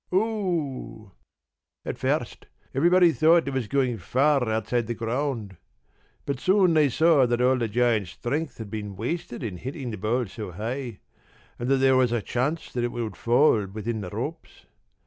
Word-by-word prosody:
p> 180 - +2
"Oo!" 170 - -2 0.7
"At - - -4
first - - -2 0.3
everybody 175 +5 +5
thought 165 0 +4
it 140 - -2
was 130 -4 -2
going 130 -4 0
far 135 - +2
outside 110 +1 -1
the 120 - -3
ground. 115 - -3 0.7
But 140 -3 -2
soon 185 +2 +4
they 150 -3 +4
saw 150 0 +4
that 120 0 0
all 125 +1 +4
the 120 -2 -1
giant's 110 -3 +1
strength 140 - -3
had 110 -3 -8
been 105 -2 -5
wasted 120 - -4
in 100 -6 -4
hitting 130 - -5
the 110 - -5
ball 120 +5 0
so 105 -3 -8
high, 115 +3 -5 0.6
and 120 - -2
that 135 - +4
there 130 0 +4
was 125 -2 +3
a 120 - +1
chance 130 +9 -2
that 120 - -1
it 120 - -1
would 115 -4 -4
fall 120 -4 +3
within 110 +3 -4
the 95 - -6
ropes. - - -6
125 Hz, 175 wpm, -25 LUFS, 110-145 Hz, 0.7 s, everybody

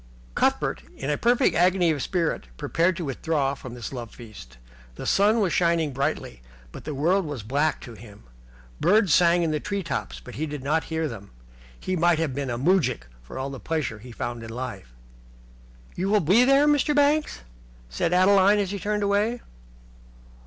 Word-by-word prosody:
Cuthbert - - 0 0.2
in 135 +2 -3
a - - +1
perfect 245 +3 +3
agony 180 -1 +3
of 145 -3 -2
spirit 165 - -1
prepared 170 - 0
to 175 - -4
withdraw 140 0 -1
from 130 -3 -9
this 120 +2 -7
love 120 -3 -6
feast. 105 - -13 0.4
The - - -7
sun 210 +3 +3
was 190 -4 +1
shining 170 -4 +1
brightly, 135 - -3 0.3
but - - -11
the 150 - -4
world 175 +8 +2
was 145 - -6
black 145 +8 0
to 120 - -10
him. 105 - -14 0.6
Birds 200 -4 +3
sang 175 -1 +4
in 160 - 0
the 155 - -1
tree 200 +4 -3
tops, 60 - -4
but - - -12
he 150 +9 -3
did 145 -3 -6
not 155 +3 0
hear 160 -1 -2
them. 100 -7 -9 0.5
He 185 - -2
might 175 -1 +3
have 160 -4 -1
been 140 0 -3
a 120 - -2
moujik 165 - +1 0.2
for - - -10
all 135 +1 -4
the 135 - -7
pleasure 145 -9 -3
he 125 +3 -12
found 120 0 -5
in 115 - -8
life. 115 - -7 1.0
"You 190 +2 -2
will 210 0 +4
be 200 +9 +4
there, 275 +2 +5
Mr. 295 0 +2
Banks?" 290 - +2 0.5
said 60 - -2
Adeline, 195 +2 +5
as 200 -2 -1
he 200 - -4
turned 210 +2 -1
away. 210 +4 +1
160 Hz, 190 wpm, -25 LUFS, 130-190 Hz, 1.0 s, there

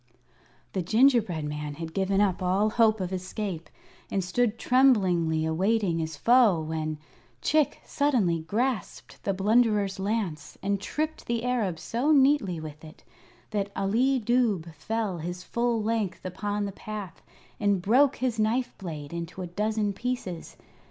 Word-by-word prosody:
The 190 - 0
gingerbread 220 - +3
man 150 0 -4
had 165 +1 -7
given 195 0 +1
up 195 -3 +1
all 190 +4 +2
hope 220 -1 +3
of 185 0 -3
escape 185 -2 -4 0.4
and 195 - -1
stood 225 +5 0
tremblingly 185 -12 +3
awaiting 185 +2 +1
his 160 -2 -4
foe 230 - +5
when, 155 -1 -3 0.5
Chick 305 -1 +2
suddenly 235 - +1
grasped 225 +10 -3
the 200 - 0
Blunderer's 210 -1 +2
lance 195 -7 -3
and 200 0 0
tripped 310 +8 -3
the 235 -1 -1
Arab 230 -9 0
so 240 - 0
neatly 270 - +3
with 155 -1 -9
it 155 -1 -13 0.5
that 200 -1 -1
Ali 240 +7 +2
Dubh 215 -8 +1
fell 200 +3 -3
his 175 +3 -5
full 235 0 0
length 215 -5 -2
upon 205 +3 -2
the 200 - -4
path 205 -3 -7 0.4
and 205 -2 +2
broke 255 +9 +4
his 245 -3 -2
knife 235 +4 0
blade 155 -5 -7
into 170 +2 -5
a - - -3
dozen 210 +3 -1
pieces. 215 -6 -4
200 Hz, 145 wpm, -27 LUFS, 175-235 Hz, 0.5 s, foe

